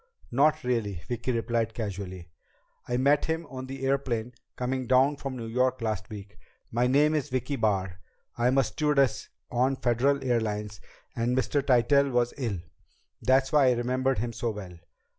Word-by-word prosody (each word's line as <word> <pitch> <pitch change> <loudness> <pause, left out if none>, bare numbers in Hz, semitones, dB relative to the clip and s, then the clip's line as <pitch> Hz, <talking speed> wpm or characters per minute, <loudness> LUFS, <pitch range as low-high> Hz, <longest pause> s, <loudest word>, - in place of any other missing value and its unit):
"Not 145 +5 +3
really," 105 -8 -1
Vicki 120 +1 -2
replied 115 -1 -1
casually. 95 -6 -5 0.6
"I 125 - 0
met 140 +3 +3
him 160 +1 -2
on 130 0 -6
the 135 0 -5
airplane 125 -3 -1 0.2
coming 130 0 -2
down 130 +3 +4
from 135 -2 -5
New 115 - -5
York 125 +3 +1
last 110 -5 -3
week. 100 -1 -10 0.3
My 120 +2 +2
name's 150 +2 +2
Vicki 130 +2 -2
Barr. 95 -6 0 0.4
I'm 125 +3 +2
a 135 - +5
stewardess 140 -3 +1 0.2
on 130 +3 +2
Federal 130 +3 +1
Airlines 105 -6 -1 0.3
and 120 +2 0
Mr. 130 +3 +1
Tytell 140 +2 +4
was 120 -1 +1
ill. 115 -7 -1 0.6
That's 130 +1 +3
why 145 -3 +5
I 125 - +5
remembered 130 +2 0
him 115 +2 -2
so 115 - -2
well." 100 -5 -7
125 Hz, 160 wpm, -28 LUFS, 115-135 Hz, 0.6 s, a